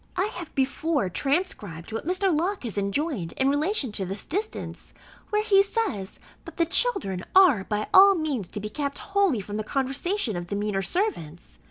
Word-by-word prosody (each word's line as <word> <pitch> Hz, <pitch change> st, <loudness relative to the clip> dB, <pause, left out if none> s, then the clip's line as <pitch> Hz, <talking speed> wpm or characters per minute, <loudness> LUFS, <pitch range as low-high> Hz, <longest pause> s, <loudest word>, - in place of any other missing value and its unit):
I 365 Hz, -, +1 dB
have 345 Hz, -3 st, -8 dB
before 275 Hz, -, 0 dB
transcribed 270 Hz, -, -2 dB
what 225 Hz, +7 st, -5 dB
Mr. 370 Hz, -1 st, +1 dB
Locke 365 Hz, +4 st, -1 dB
has 230 Hz, -4 st, -4 dB
enjoined 200 Hz, -, -2 dB
in 265 Hz, +1 st, +1 dB
relation 290 Hz, -, +1 dB
to 205 Hz, -1 st, -4 dB
this 195 Hz, +2 st, -2 dB
distance, 410 Hz, +7 st, -5 dB, 0.3 s
where 425 Hz, 0 st, +1 dB
he 395 Hz, -2 st, +5 dB
says, 395 Hz, -, -2 dB, 0.3 s
that -, -, -11 dB
the 335 Hz, -, +3 dB
children 255 Hz, -, +1 dB
are 355 Hz, -, +6 dB
by 210 Hz, 0 st, -2 dB
all 395 Hz, +1 st, +8 dB
means 290 Hz, -, -2 dB
to 210 Hz, -, -5 dB
be 210 Hz, -, -4 dB
kept 280 Hz, +4 st, -3 dB, 0.2 s
wholly 390 Hz, -, +3 dB
from 205 Hz, +2 st, -6 dB
the 215 Hz, -, -2 dB
conversation 270 Hz, -, -1 dB
of 175 Hz, 0 st, -5 dB
the 200 Hz, -, -3 dB
meaner 205 Hz, -1 st, -1 dB
servants. 190 Hz, -, -3 dB
280 Hz, 180 wpm, -25 LUFS, -, 0.3 s, all